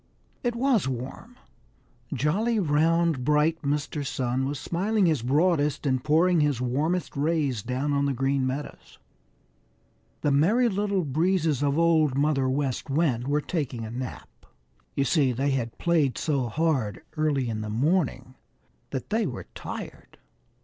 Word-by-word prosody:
It 240 -1 0
was 240 - +2
warm. 135 - -6 0.8
Jolly, 175 - +1
round, 165 -3 +2
bright 150 +3 +2
Mr. 145 0 -2
Sun 130 -1 -1
was 145 +1 -3
smiling 195 +8 0
his 155 -7 +2
broadest 150 +2 +1
and 130 -2 +1
pouring 165 +3 +3
his 145 -4 +1
warmest 150 +8 -1
rays 145 -5 0
down 130 +6 -2
on 140 0 +1
the 140 - 0
Green 135 +1 0
Meadows. 140 +3 -6 1.2
The 145 - +1
Merry 210 - +3
Little 200 -2 0
Breezes 160 0 +1
of 145 0 +1
Old 160 -5 +3
Mother 140 -2 +2
West 135 0 -2
Wind 135 -5 +1
were 145 +1 +1
taking 135 -9 -3
a 110 - -7
nap. 125 +1 -8 0.5
You 140 - +2
see, 140 -3 +2
they 135 +4 0
had 120 -4 -2
played 160 -6 +1
so 140 -6 0
hard 135 - -1
early 150 -5 +1
in 110 -2 -3
the 110 - -5
morning 130 - 0 0.6
that 130 - -5
they 220 -2 +1
were 125 - -6
tired. - - -8
145 Hz, 145 wpm, -26 LUFS, 130-165 Hz, 1.2 s, pouring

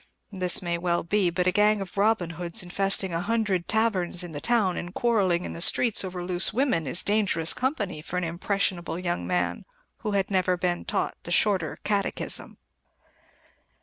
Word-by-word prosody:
This 185 -2 +1
may 170 -1 -1
well 175 0 0
be, 190 +1 +1
but 180 +1 -1
a 185 - +3
gang 210 +2 +3
of 195 -2 -7
Robin 200 -4 +1
Hoods, 170 +2 -1
infesting 190 0 0
a 165 - -1
hundred 205 -4 -1
taverns 200 -6 +1
in 175 - -7
the 145 -1 -6
town 220 -7 +2
and 175 - -5
quarrelling 195 -7 +1
in - - -5
the 170 - -8
streets 225 +4 +3
over 180 -1 -5
loose 180 0 +2
women, 220 - 0
is 130 - +2
dangerous 200 -6 +2
company 220 - -2
for 180 - -5
an 180 - -1
impressionable 175 0 -1
young 175 -1 -3
man 180 - -1 0.3
who 210 - -4
had 195 0 0
never 185 -1 +1
been 175 -1 -2
taught - - -1
the - - -9
Shorter 185 -2 +2
Catechism. 200 -2 -1
185 Hz, 180 wpm, -26 LUFS, 175-205 Hz, 0.3 s, a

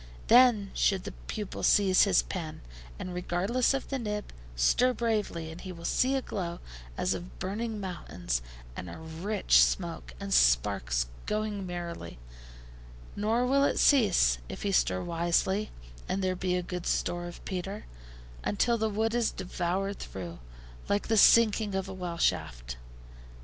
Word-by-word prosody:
Then 235 -5 +6
should 190 -2 +1
the - - -6 0.2
pupil 210 -3 -5
seize 195 -2 +5
his 195 -3 +3
pen, 165 -5 -6 0.4
and, 180 - -6
regardless 180 +8 0
of 270 - -4
the 270 - -2
nib, 210 -2 -4 0.2
stir 245 - +3
bravely, 210 -9 -2
and 160 - -10
he 185 - -7
will 170 -1 -9
see 265 +2 +2
a 265 - -1
glow 175 -3 -4 0.4
as 185 - +1
of 175 +1 -8
burning 215 +3 -3
mountains, 175 - -3 0.3
and 90 - -6
a - - -8
rich 160 - +1
smoke, - - -1
and - - -3
sparks - - +3 0.2
going 210 -2 -2
merrily; 170 - -6 1.0
nor 225 +4 +1
will 275 +2 +3
it - - +1
cease, 60 - +4
if - - -7
he 200 - 0
stir 90 - +2
wisely, 175 +5 0 0.4
and 195 +1 -1
there 185 0 0
be 180 0 -1
a 180 - -1
good 180 0 -5
store 175 0 -1
of 175 - -11
petre, 195 +3 -5 0.6
until 235 +3 +1
the 220 0 +1
wood 220 +2 0
is 240 -2 +2
devoured 185 +2 -3
through, 85 -3 -7 0.5
like 205 +2 0
the 225 - +3
sinking 215 -2 +5
of 190 0 -2
a 190 - -6
well 180 -2 -5
shaft. 65 - -1
185 Hz, 155 wpm, -29 LUFS, 170-215 Hz, 1.0 s, Then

